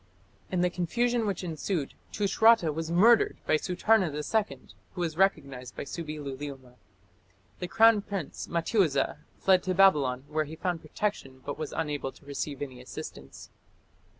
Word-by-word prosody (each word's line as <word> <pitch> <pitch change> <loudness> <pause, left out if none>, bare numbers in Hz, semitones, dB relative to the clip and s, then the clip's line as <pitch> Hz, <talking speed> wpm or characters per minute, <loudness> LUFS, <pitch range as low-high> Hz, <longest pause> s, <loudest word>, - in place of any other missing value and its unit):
In 180 -2 +1
the 180 0 +2
confusion 235 +7 0
which 190 -2 -2
ensued, 165 -2 -3 0.2
Tushratta 210 -3 +4
was 160 +1 -4
murdered 215 +7 +5
by - - +1
Sutarna 185 +4 +2
II, 200 +9 -2 0.2
who 180 - -5
was 165 -3 -1
recognized 140 - 0
by - - -4
Subbi 155 +1 -6
luliuma. 135 -2 -7 0.9
The 180 - -3
crown 225 +3 +5
prince, 195 -7 -5
Mattiuza, 170 - +1 0.2
fled 185 -1 +4
to 185 -1 -2
Babylon, 145 -10 +4
where 155 +1 -1
he 155 +2 -8
found 175 0 -2
protection, 150 -6 -4
but 145 +2 -5
was 155 - -4
unable 145 -3 -2
to - - -20
receive 140 0 -4
any 130 -3 -8
assistance. 125 - -9
165 Hz, 150 wpm, -28 LUFS, 145-195 Hz, 0.9 s, murdered